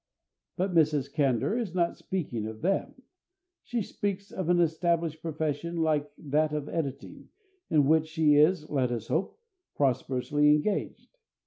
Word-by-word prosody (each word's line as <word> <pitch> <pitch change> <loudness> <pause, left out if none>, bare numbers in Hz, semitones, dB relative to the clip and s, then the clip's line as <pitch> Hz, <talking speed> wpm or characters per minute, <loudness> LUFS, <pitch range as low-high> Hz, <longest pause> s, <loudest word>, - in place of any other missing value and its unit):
But 185 0 -1
Mrs. 150 -4 +2
Candour 140 - +1
is 205 -7 -4
not 170 -1 +1
speaking 125 - -4
of 110 0 -8
them; 195 +7 -1 0.6
she 240 -3 -2
speaks 200 0 -4
of 185 -3 -3
an 175 0 +4
established 165 -1 0
profession 160 +1 -3
like 155 -3 +1
that 150 +1 0
of 150 -1 -3
editing, 140 -5 -5 0.4
in 150 -5 +4
which 160 +2 +3
she 160 -2 +3
is, 155 +2 +4
let 130 -4 0
us 115 -2 -4
hope, 185 - -1 0.4
prosperously 140 +2 +1
engaged. 195 - -1
155 Hz, 140 wpm, -28 LUFS, 145-175 Hz, 0.6 s, an